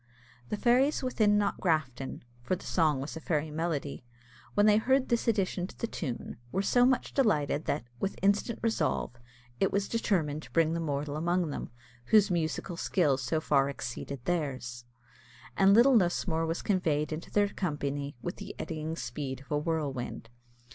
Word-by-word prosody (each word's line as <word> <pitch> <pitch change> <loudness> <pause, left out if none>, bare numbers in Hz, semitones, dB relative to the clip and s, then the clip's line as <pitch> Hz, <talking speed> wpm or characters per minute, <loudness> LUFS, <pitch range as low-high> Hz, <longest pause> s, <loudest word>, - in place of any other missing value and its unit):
The 210 - -2
fairies 255 +6 +3
within 215 -5 +3
Knockgrafton, 155 -10 -1 0.2
for 155 +10 0
the 185 - -11
song 155 -5 +2
was 140 - -5
a - - -5
fairy 155 -1 -1
melody, 150 -4 -3 0.5
when 205 - +5
they 210 -1 +6
heard 260 +4 +2
this 235 -1 +1
addition 195 -5 +1
to - - -15
the - - -2
tune, 125 - -5
were 195 - 0
so 245 +4 +4
much 260 -1 0
delighted 155 - +2
that, - - -1 0.2
with 195 - -2
instant 205 +3 +2
resolve, 220 - 0 0.5
it 195 - +2
was 200 0 0
determined 165 -10 0
to - - -14
bring 165 -1 +3
the 170 - -1
mortal 145 -2 -2
among 175 0 0
them, - - -5 0.4
whose 210 - +5
musical 170 +1 -1
skill 160 -6 +2
so 130 +4 -1
far 140 -3 +2
exceeded 130 -1 -6
theirs, 130 -8 -2 0.7
and 195 +1 +6
little 250 +3 +6
Lusmore 175 -4 +2
was 165 +1 -2
conveyed 160 -6 +1
into 155 - -6
their 205 -1 +2
company 145 -6 -3
with 175 - -4
the - - -8
eddying 160 0 -4
speed 135 -5 -5
of 135 - -18
a 150 - +2
whirlwind. 145 -7 -3
165 Hz, 170 wpm, -30 LUFS, 145-200 Hz, 0.7 s, they